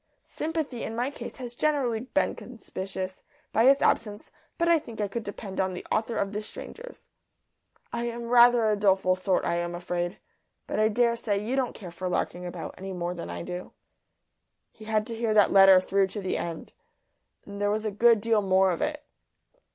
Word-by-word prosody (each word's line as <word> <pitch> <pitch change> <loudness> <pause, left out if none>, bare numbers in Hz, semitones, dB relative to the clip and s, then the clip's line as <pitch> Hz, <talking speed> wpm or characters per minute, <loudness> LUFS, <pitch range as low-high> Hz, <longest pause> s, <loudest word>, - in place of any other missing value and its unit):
Sympathy 310 -6 -4
in 225 - -4
my 245 +4 -1
case - - -8
has 245 -2 -7
generally 265 -5 0
been 260 +5 0
conspicuous 190 -5 -6 0.3
by 225 - +4
its 275 +1 +5
absence, 210 -2 0 0.3
but 340 - +1
I 335 -1 +5
think 230 -6 -11
I 205 - 0
could 230 +3 -4
depend 200 -1 -7
on 185 -1 -1
the - - -7
author 225 +1 0
of 200 +1 -1
"The 210 - -2
Strangers." 475 - -10 0.8
I 235 0 -2
am 235 0 -4
rather 240 0 +6
a 215 -1 +3
doleful 190 -2 +3
sort, 185 0 0
I 170 - 0
am 175 0 -2
afraid, 175 +1 -3 0.5
but - - -3
I 215 - +5
daresay 230 -2 +1
you 240 +5 -1
don't 260 -3 -1
care 185 -5 -9
for 180 +2 -4
larking 180 0 -2
about 175 - -6
any 190 0 -6
more 175 -1 -3
than 170 - -7
I 85 0 -5
do.'" 180 +1 -7 1.0
He 215 - -14
had 215 -1 0
to 230 - -6
hear 225 -1 0
that 210 - +5
letter 195 -1 +8
through 195 +1 +1
to 205 - -6
the 190 -2 -2
end, 165 -1 -5 0.7
and 200 0 -8
there 205 - +2
was 215 +1 -1
a 215 - -1
good 225 +1 +4
deal 225 -1 +2
more 190 -1 +3
of 170 - -3
it. 300 -1 -2
210 Hz, 200 wpm, -27 LUFS, 190-235 Hz, 1.0 s, letter